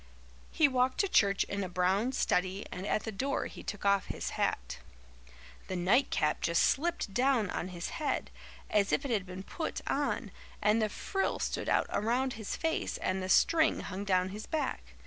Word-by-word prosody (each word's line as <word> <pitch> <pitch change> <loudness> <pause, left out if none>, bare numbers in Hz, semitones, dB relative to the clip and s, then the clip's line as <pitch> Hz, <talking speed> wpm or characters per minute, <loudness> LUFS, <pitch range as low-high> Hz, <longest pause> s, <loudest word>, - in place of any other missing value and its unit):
He 310 - +4
walked 255 -1 +1
to 400 - +1
church 200 - +3
in 200 0 -3
a 185 - -4
brown 185 +7 +1
study 190 -3 0
and 185 +3 -5
at 215 - 0
the 220 - -4
door 270 +7 -1
he - - -8
took 205 -1 -6
off 200 -1 +3
his - - -4
hat. - - -2 0.9
The 185 - -3
nightcap 180 - +2
just 170 0 +2
slipped 325 - 0
down 245 -4 +2
on - - -3
his 175 -1 -5
head, 295 - -1 0.4
as 205 -1 +3
if 280 - +1
it 270 - -2
had 200 -4 0
been 185 +1 -7
put 320 - -4
on, 270 -6 -1 0.3
and 215 +2 +3
the 215 - +1
frill 385 - -1
stood - - -2
out - - +3
around 245 +4 +1
his 220 -2 -4
face 325 -1 -1
and 185 0 -1
the 185 - -4
string 320 - +4
hung 195 +1 -5
down 185 -2 +2
his 210 +3 -7
back. 255 - -3
205 Hz, 185 wpm, -31 LUFS, 185-260 Hz, 0.9 s, He